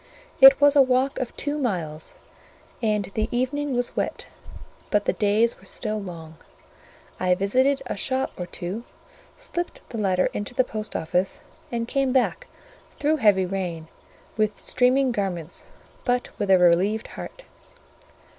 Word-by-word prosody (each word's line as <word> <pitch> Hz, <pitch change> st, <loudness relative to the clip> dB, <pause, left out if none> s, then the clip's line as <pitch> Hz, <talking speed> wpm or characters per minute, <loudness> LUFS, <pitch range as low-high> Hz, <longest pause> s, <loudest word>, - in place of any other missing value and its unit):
It 270 Hz, 0 st, +10 dB
was 285 Hz, 0 st, +5 dB
a 285 Hz, -, +8 dB
walk 260 Hz, +1 st, +2 dB
of 255 Hz, -, -5 dB
two 290 Hz, +1 st, -2 dB
miles, 165 Hz, -, -3 dB, 0.7 s
and 210 Hz, -4 st, 0 dB
the 220 Hz, 0 st, -1 dB
evening 265 Hz, +3 st, -1 dB
was 245 Hz, 0 st, -1 dB
wet, -, -, -2 dB, 0.6 s
but 205 Hz, -1 st, +1 dB
the -, -, +2 dB
days 215 Hz, +3 st, +2 dB
were -, -, -18 dB
still 215 Hz, -2 st, -3 dB
long; 165 Hz, -4 st, -9 dB, 0.8 s
I 180 Hz, 0 st, +3 dB
visited 260 Hz, +8 st, +2 dB
a -, -, -3 dB
shop 260 Hz, +6 st, -1 dB
or 180 Hz, -, -5 dB
two, 190 Hz, +6 st, -5 dB, 0.5 s
slipped 350 Hz, -9 st, -5 dB
the 230 Hz, -, -5 dB
letter 185 Hz, -3 st, +2 dB
into 205 Hz, +4 st, -5 dB
the 255 Hz, -, +4 dB
post 215 Hz, -3 st, -6 dB
office, 180 Hz, +4 st, -1 dB, 0.3 s
and 230 Hz, -1 st, -2 dB
came 270 Hz, 0 st, +1 dB
back 270 Hz, -, +1 dB, 0.5 s
through 305 Hz, +2 st, +1 dB
heavy 205 Hz, -7 st, +4 dB
rain, 175 Hz, -4 st, -4 dB, 0.5 s
with 215 Hz, -1 st, 0 dB
streaming 255 Hz, +1 st, +2 dB
garments, 185 Hz, -6 st, -4 dB, 0.4 s
but 245 Hz, -1 st, 0 dB
with 205 Hz, -, -1 dB
a 190 Hz, -, +7 dB
relieved 180 Hz, +5 st, +3 dB
heart. -, -, -9 dB
220 Hz, 145 wpm, -24 LUFS, 190-260 Hz, 0.8 s, It